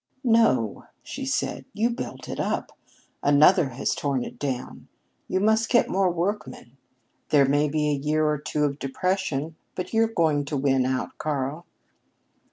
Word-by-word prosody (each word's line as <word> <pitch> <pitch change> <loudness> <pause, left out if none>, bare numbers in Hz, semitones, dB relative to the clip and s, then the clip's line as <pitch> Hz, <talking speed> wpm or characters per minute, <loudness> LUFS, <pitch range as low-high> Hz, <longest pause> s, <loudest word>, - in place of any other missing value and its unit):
"No," 230 -2 +2 0.2
she 270 -1 -6
said, 260 - -2
"you 225 +3 +1
built 235 - -6
up; - - -3 0.5
another 150 +2 +5
has 130 +2 -1
torn 140 -4 -1
down. 130 -3 -5 0.4
You 185 - 0
must 220 +2 +2
get 240 - +3
more 190 0 +2
workmen. 175 - -3 0.5
There 145 -2 +5
may 145 +2 +2
be 150 0 0
a 140 -2 -1
year 155 +1 +1
or 150 -1 +1
two 150 0 -2
of 140 0 -2
depression, 160 0 -2 0.2
but 180 - -5
you're 225 0 +4
going 160 -9 +1
to 145 +1 -3
win 135 -2 +2
out, 130 0 -2
Karl." 150 +2 -3
150 Hz, 150 wpm, -25 LUFS, 140-195 Hz, 0.5 s, another